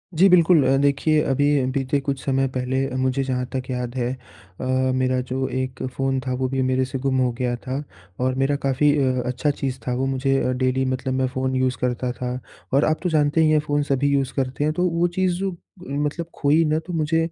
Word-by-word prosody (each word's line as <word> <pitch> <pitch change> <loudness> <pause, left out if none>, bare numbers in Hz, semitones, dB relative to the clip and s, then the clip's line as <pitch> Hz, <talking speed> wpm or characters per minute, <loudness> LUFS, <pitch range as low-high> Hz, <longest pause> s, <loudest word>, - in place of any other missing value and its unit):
जी 190 +5 +6
बिल्कुल। 170 -4 +5
अ, 135 - +4
देखिए 145 +2 +2
अभी 145 0 +2
बीते 135 +1 0
कुछ 135 -1 -3
समय 135 0 +1
पहले 130 +1 -1
मुझे 130 +1 0
जहाँ 125 -1 -1
तक 130 0 -3
याद 125 -1 -3
है 125 0 -1 0.5
अ, - - -3 0.3
मेरा 130 0 +1
जो 130 +1 -2
एक 130 -1 -4
फ़ोन 135 0 0
था 130 - 0
वो 130 +1 -1
भी 135 -1 -1
मेरे 130 0 +1
से 130 0 -5
गुम 135 0 0
हो 125 -1 +2
गया 125 -1 0
था। 130 +4 -5 0.4
और 130 0 0
मेरा 135 +2 +1
काफ़ी 140 +2 +3
अ, 130 -2 +1
अच्छा 125 +4 -1
चीज़ 135 -2 -3
था 125 - +1
वो 130 +1 0
मुझे 135 0 +1
अ, 125 - +1
डेली 130 +1 0
मतलब 130 0 -2
मैं 130 0 +1
फ़ोन 130 0 -2
यूज़ 130 0 +1
करता 125 0 -1
था। 125 0 -4 0.4
और 140 - +4
आप 155 0 +1
तो 180 - +1
जानते 150 0 +2
ही 155 - +4
हैं 155 - +4
फ़ोन 145 -1 0
सभी 140 0 +1
यूज़ 135 -2 +1
करते 135 +1 -1
हैं, 155 +1 +1
तो 180 +2 0
वो 170 +1 +1
चीज़ 185 +1 -1 0.5
मतलब 150 +4 -2
खोई 150 +3 +3
ना 155 +1 +1
तो 180 - -6
मुझे 160 0 +1
135 Hz, 220 wpm, -23 LUFS, 130-145 Hz, 0.5 s, जी